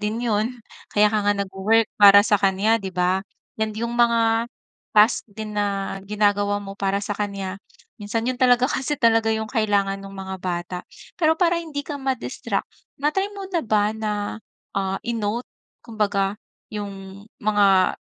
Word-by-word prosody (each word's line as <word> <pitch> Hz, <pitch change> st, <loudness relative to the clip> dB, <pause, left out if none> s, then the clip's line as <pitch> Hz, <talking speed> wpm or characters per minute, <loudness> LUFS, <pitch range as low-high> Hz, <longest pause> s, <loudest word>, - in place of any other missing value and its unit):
din 215 Hz, +2 st, -2 dB
yun. 225 Hz, +2 st, 0 dB, 0.4 s
Kaya 210 Hz, 0 st, +5 dB
ka 215 Hz, -, +2 dB
nga 205 Hz, -, +4 dB
nag-wo-work 200 Hz, +3 st, +2 dB, 0.2 s
para 200 Hz, 0 st, +10 dB
sa 210 Hz, -, +4 dB
kanya 195 Hz, +3 st, +3 dB
'di 195 Hz, -, -4 dB
ba, 180 Hz, +1 st, +2 dB, 0.4 s
and 220 Hz, 0 st, 0 dB
yung 235 Hz, +1 st, -2 dB
mga 230 Hz, -1 st, +3 dB, 0.5 s
task 210 Hz, +3 st, +5 dB
din 215 Hz, +1 st, -7 dB
na 200 Hz, -1 st, -1 dB
ginagawa 205 Hz, -1 st, +2 dB
mo 195 Hz, -1 st, -7 dB
para 195 Hz, 0 st, 0 dB
sa 205 Hz, -, -2 dB
kanya. 195 Hz, -2 st, -4 dB, 0.4 s
Minsan 215 Hz, +2 st, -2 dB
yun 255 Hz, -, -1 dB
talaga 250 Hz, -1 st, +5 dB
kasi 295 Hz, +1 st, -1 dB
talaga 225 Hz, -1 st, +4 dB
yung 220 Hz, 0 st, -2 dB
kailangan 200 Hz, -3 st, +1 dB
nung 195 Hz, 0 st, -10 dB
mga 190 Hz, 0 st, -5 dB
bata. 180 Hz, 0 st, -3 dB, 0.4 s
Pero 320 Hz, -1 st, +4 dB
para 345 Hz, -2 st, +3 dB
hindi 310 Hz, -4 st, -5 dB
ka 295 Hz, -, -5 dB
ma-distract 265 Hz, -2 st, -2 dB, 0.4 s
na-try 345 Hz, +8 st, +1 dB
mo 395 Hz, -, -6 dB
na 340 Hz, -, +2 dB
ba 215 Hz, -1 st, +2 dB
na, 210 Hz, -1 st, -3 dB, 0.4 s
ah, 195 Hz, 0 st, 0 dB
i-note 230 Hz, 0 st, -2 dB, 0.4 s
kumbaga 205 Hz, -3 st, 0 dB, 0.4 s
yung 200 Hz, -1 st, -7 dB, 0.2 s
mga 200 Hz, -3 st, +4 dB
210 Hz, 155 wpm, -23 LUFS, 195-230 Hz, 0.5 s, para